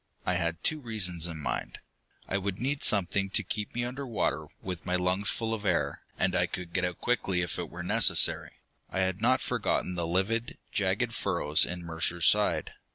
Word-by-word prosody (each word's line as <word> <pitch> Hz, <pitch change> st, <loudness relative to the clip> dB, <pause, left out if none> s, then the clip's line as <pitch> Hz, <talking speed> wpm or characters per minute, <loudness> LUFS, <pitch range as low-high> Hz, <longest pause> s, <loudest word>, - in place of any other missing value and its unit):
I 90 Hz, -, +1 dB
had 85 Hz, -1 st, -2 dB
two 155 Hz, -, +2 dB
reasons 90 Hz, -, +1 dB
in 85 Hz, -2 st, -6 dB
mind. 75 Hz, -, -4 dB, 0.5 s
I 100 Hz, -, 0 dB
would 100 Hz, -1 st, -3 dB
need 140 Hz, +3 st, -1 dB
something 100 Hz, -1 st, +4 dB
to -, -, 0 dB
keep 105 Hz, +1 st, -4 dB
me 120 Hz, 0 st, -1 dB
under 130 Hz, +3 st, -5 dB
water, 80 Hz, -, -1 dB
with 90 Hz, -3 st, -6 dB
my 90 Hz, 0 st, -1 dB
lungs 90 Hz, +2 st, +1 dB
full 115 Hz, -1 st, -2 dB
of 110 Hz, -2 st, -4 dB
air, 85 Hz, -7 st, 0 dB, 0.2 s
and -, -, +1 dB
I -, -, +2 dB
could 85 Hz, -2 st, -7 dB
get 90 Hz, -, 0 dB
out 90 Hz, -1 st, -2 dB
quickly 95 Hz, -7 st, 0 dB
if 85 Hz, -, -3 dB
it -, -, -4 dB
were -, -, -7 dB
necessary. -, -, +4 dB, 0.4 s
I 95 Hz, -, -1 dB
had 95 Hz, +1 st, -1 dB
not 130 Hz, +3 st, +3 dB
forgotten 90 Hz, -, -1 dB
the 85 Hz, -2 st, -2 dB
livid, 105 Hz, +7 st, -1 dB
jagged -, -, 0 dB
furrows 75 Hz, +1 st, +2 dB
in 90 Hz, 0 st, -5 dB
Mercer's 85 Hz, +1 st, -2 dB
side. 105 Hz, 0 st, +3 dB
95 Hz, 195 wpm, -29 LUFS, 85-110 Hz, 0.5 s, something